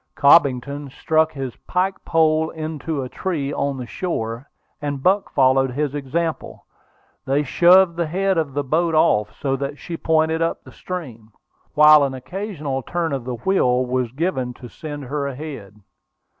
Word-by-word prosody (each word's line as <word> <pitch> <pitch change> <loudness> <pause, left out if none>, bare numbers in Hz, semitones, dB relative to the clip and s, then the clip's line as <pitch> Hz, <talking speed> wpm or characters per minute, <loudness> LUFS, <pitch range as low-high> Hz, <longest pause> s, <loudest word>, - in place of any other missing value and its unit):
Cobbington 140 -1 +3
struck 160 +3 +1
his 135 -4 -5
pike 190 +2 -1
pole 160 -1 +2
into 155 -2 -4
a - - -5
tree 145 -2 -3
on 140 -1 -1
the 125 - -5
shore, 120 -4 -4 0.3
and 145 -2 -4
Buck 195 +2 +2
followed 135 0 +3
his 145 +1 -1
example. 155 +3 -3 0.6
They 140 +2 +1
shoved 175 +4 +5
the 170 -2 0
head 190 +4 0
of 155 -5 -2
the 145 - 0
boat 160 +4 +1
off, 105 -8 +3
so 135 -1 0
that 140 +2 -4
she 165 +2 -6
pointed 160 0 +1
up 165 - -1
the - - -14
stream, 125 -12 -7 0.4
while 150 0 +8
an 135 -1 -1
occasional 150 - -4
turn 165 +2 -2
of 130 -3 -3
the 125 -1 -3
wheel 125 - +1
was 125 -2 -1
given 130 -4 -2
to 125 - -11
send 145 -1 -7
her 140 +2 -3
ahead. 135 -8 -8
145 Hz, 160 wpm, -21 LUFS, 130-165 Hz, 0.6 s, while